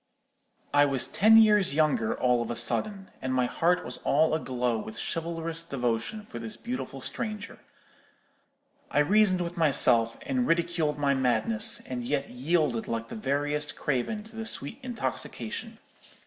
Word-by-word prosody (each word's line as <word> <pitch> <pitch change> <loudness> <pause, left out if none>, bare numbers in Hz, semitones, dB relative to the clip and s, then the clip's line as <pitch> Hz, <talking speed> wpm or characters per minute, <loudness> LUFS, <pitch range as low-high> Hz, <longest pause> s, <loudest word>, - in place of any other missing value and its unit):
I 145 0 +6
was 135 -3 +2
ten 220 +2 +5
years 210 -8 +5
younger 150 -8 +1
all 125 -1 +2
of 120 - -4
a 120 - -2
sudden, 195 - -1
and 130 0 -2
my 125 -1 +2
heart 175 +8 +1
was 125 - -4
all 155 +2 +2
a 160 - +1
glow 125 -4 -1
with 110 - -8
chivalrous 165 0 -3
devotion 135 - -3
for - - -8
this 215 -1 -7
beautiful 235 - -6
stranger. 215 - -5 1.3
I 145 - +2
reasoned 190 +2 +3
with 175 0 -5
myself, 125 -7 +4
and 260 -3 -1
ridiculed 165 -3 0
my 140 -1 +2
madness, 210 - +2
and 125 -1 -5
yet 140 +2 -2
yielded 130 -2 0
like 115 0 -4
the - - -7
veriest 145 +5 -2
craven 150 - -2
to 220 +1 -15
the 225 0 -3
sweet 185 - -2
intoxication. 245 -3 -4
150 Hz, 155 wpm, -27 LUFS, 125-205 Hz, 1.3 s, I